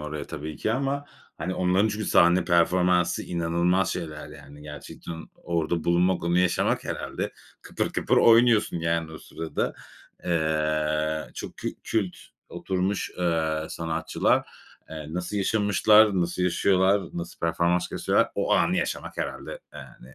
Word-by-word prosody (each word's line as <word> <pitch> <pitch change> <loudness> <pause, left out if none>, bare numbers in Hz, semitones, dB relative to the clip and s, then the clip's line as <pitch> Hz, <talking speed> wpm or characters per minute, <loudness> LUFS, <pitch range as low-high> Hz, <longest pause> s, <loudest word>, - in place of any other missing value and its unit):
oraya 75 -1 -5
tabii 75 0 -6
ki 110 - -1
ama, 140 +3 -1 0.3
hani, 90 +4 -3
onların 95 +4 +2
çünkü 105 0 -3
sahne 85 +1 +4
performansı 90 0 +2
inanılmaz 85 +2 0
şeyler, 75 -2 -6
yani, 75 0 -13
gerçekten 75 +2 -9
orada 85 -1 -2
bulunmak, 90 +2 +2
onu 85 +1 +2
yaşamak, 90 -1 +1
herhâlde - - -4 0.3
kıpır - - -3
kıpır - - +1
oynuyorsun, 115 -4 +5
yani, 80 -1 -1
o 80 - -8
sırada. 80 -1 -4 0.5
Eee, 75 -1 0
çok - - -7
kü - - -3 0.2
kült 100 -5 -1 0.3
oturmuş, 95 +1 -2
eee, 80 -3 0
sanatçılar. 80 -1 0 0.4
Eee, 80 -2 -7
nasıl 90 +3 -3
yaşamışlar? 105 0 +4
Nasıl 85 +1 -1
yaşıyorlar? 95 +2 +3
Nasıl 85 -1 -7
performans 85 +2 +1
gösteriyorlar? - - +1
O - - 0
anı - - +3
yaşamak, - - -3
herhâlde, - - -5
yani, 65 +2 -13
85 Hz, 130 wpm, -26 LUFS, 80-95 Hz, 0.5 s, oynuyorsun